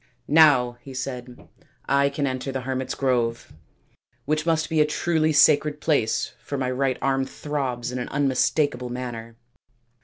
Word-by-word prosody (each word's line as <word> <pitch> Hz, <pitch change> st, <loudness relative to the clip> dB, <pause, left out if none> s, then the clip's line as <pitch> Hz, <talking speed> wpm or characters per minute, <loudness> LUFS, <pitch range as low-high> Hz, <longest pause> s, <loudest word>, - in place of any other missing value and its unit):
" 120 Hz, 0 st, -43 dB
Now," 135 Hz, -6 st, +5 dB
he 135 Hz, -1 st, -11 dB
said, 125 Hz, -2 st, -6 dB, 0.2 s
" -, -, -36 dB
I 140 Hz, +1 st, +3 dB
can 140 Hz, 0 st, -2 dB
enter 130 Hz, 0 st, -3 dB
the 130 Hz, 0 st, -3 dB
hermits 130 Hz, 0 st, -3 dB
5 -, -, -19 dB
grove, 120 Hz, -3 st, -1 dB, 0.7 s
which 155 Hz, +2 st, -1 dB
must 160 Hz, -1 st, +1 dB
be 160 Hz, -1 st, +2 dB
a -, -, +5 dB
truly 155 Hz, 0 st, +1 dB
sacred 150 Hz, 0 st, +4 dB
place 145 Hz, -9 st, 0 dB
for 140 Hz, -, -5 dB
my 130 Hz, -1 st, -1 dB
right 130 Hz, 0 st, 0 dB
arm 135 Hz, 0 st, +1 dB
throbs 130 Hz, -4 st, -4 dB
in 125 Hz, -, -4 dB
an 125 Hz, -, -5 dB
un 145 Hz, 0 st, 0 dB
mistakable 130 Hz, -1 st, 0 dB
manner." 120 Hz, -2 st, -6 dB
135 Hz, 175 wpm, -24 LUFS, 125-145 Hz, 0.7 s, Now